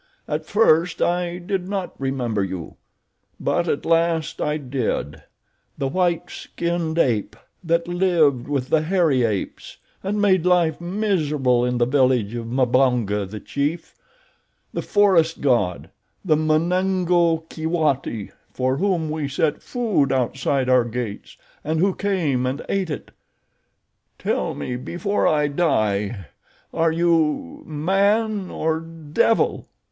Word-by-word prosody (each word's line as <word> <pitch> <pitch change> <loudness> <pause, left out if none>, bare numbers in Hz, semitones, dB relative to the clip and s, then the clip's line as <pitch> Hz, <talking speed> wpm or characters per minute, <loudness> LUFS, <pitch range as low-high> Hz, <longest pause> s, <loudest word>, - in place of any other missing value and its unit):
At - - -3
first 175 -6 +3
I 175 0 0
did 180 +1 -3
not 195 -3 -3
remember 125 -6 -1
you; 95 -3 -6 0.6
but 175 0 0
at 145 - -1
last 165 -1 +1
I 150 0 0
did—the 130 - -5
white 175 +3 0
skinned 170 -1 -3
ape 115 -10 +1 0.3
that 170 0 +1
lived 170 -8 +2
with 140 -3 -2
the 160 - +3
hairy 160 -6 +2
apes 105 -4 -3 0.3
and 205 +2 -1
made 190 -4 +3
life 175 -3 +2
miserable 155 - +1
in 125 0 0
the 120 - +3
village 125 -5 +2
of 115 -1 -5
Mbonga, 125 -5 +1
the 105 +1 -7
chief—the 170 - -6
forest 185 -6 +3
god—the 125 - -1
Munango 170 +1 +2
Keewati 155 - -1 0.2
for 130 +1 0
whom 180 -3 0
we 155 -2 -2
set 145 +2 0
food 220 - 0
outside 130 +1 0
our 130 -1 +5
gates 115 -3 -6 0.3
and 155 +1 -1
who 190 +2 +3
came 160 -12 0
and 135 +3 -3
ate 195 -3 -1
it. 150 - -6 1.1
Tell - - -1
me 125 - -4
before 190 +10 -1
I 150 -1 +2
die—are 110 - -1
you 170 - +1
man 195 +6 +1
or 160 0 -1
devil?" 165 +6 0
160 Hz, 120 wpm, -22 LUFS, 130-175 Hz, 1.1 s, our